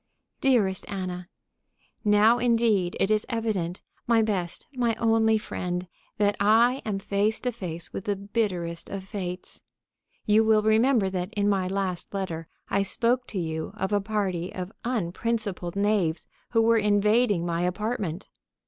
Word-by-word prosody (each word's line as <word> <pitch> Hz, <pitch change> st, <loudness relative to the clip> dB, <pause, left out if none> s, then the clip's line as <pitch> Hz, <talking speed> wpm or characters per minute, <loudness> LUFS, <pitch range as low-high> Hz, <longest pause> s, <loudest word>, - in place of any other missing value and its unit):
_ -, -, -46 dB
DEAREST 215 Hz, -8 st, +2 dB
ANNA: 180 Hz, -3 st, -5 dB, 0.7 s
Now, 215 Hz, +3 st, +5 dB
indeed, 225 Hz, -6 st, +2 dB
it 195 Hz, -, +2 dB
is 215 Hz, 0 st, +3 dB
evident, 205 Hz, -7 st, -2 dB, 0.2 s
my 230 Hz, -1 st, +4 dB
best, 185 Hz, -5 st, -2 dB
my 240 Hz, -3 st, +1 dB
only 225 Hz, -1 st, +3 dB
friend, 180 Hz, -3 st, -4 dB, 0.3 s
that 205 Hz, -1 st, +2 dB
I 230 Hz, +6 st, +4 dB
am 210 Hz, -3 st, -1 dB
face 200 Hz, +2 st, 0 dB
to 250 Hz, -, -1 dB
face 170 Hz, -7 st, -6 dB
with 195 Hz, -, -5 dB
the 205 Hz, -, 0 dB
bitterest 195 Hz, -5 st, -2 dB
of 195 Hz, -1 st, -5 dB
fates. 185 Hz, -2 st, -6 dB, 0.6 s
You 215 Hz, +1 st, +5 dB
will 220 Hz, -1 st, +4 dB
remember 220 Hz, 0 st, +3 dB
that 185 Hz, +1 st, -3 dB
in 205 Hz, 0 st, +1 dB
my 195 Hz, -2 st, +1 dB
last 190 Hz, -1 st, -3 dB
letter 165 Hz, -5 st, -3 dB, 0.2 s
I 200 Hz, -, +1 dB
spoke 240 Hz, +5 st, +1 dB
to 195 Hz, -, -4 dB
you 160 Hz, +1 st, -3 dB
of 200 Hz, -1 st, -2 dB
a 205 Hz, -, +3 dB
party 195 Hz, -4 st, -2 dB
of 185 Hz, +1 st, -6 dB
unprincipled 215 Hz, -4 st, -2 dB
knaves 200 Hz, -5 st, +1 dB, 0.2 s
who 225 Hz, -1 st, +3 dB
were 230 Hz, 0 st, +4 dB
invading 210 Hz, -2 st, +3 dB
my 170 Hz, 0 st, -1 dB
apartment. 190 Hz, -1 st, -2 dB
205 Hz, 150 wpm, -26 LUFS, 180-220 Hz, 0.7 s, Now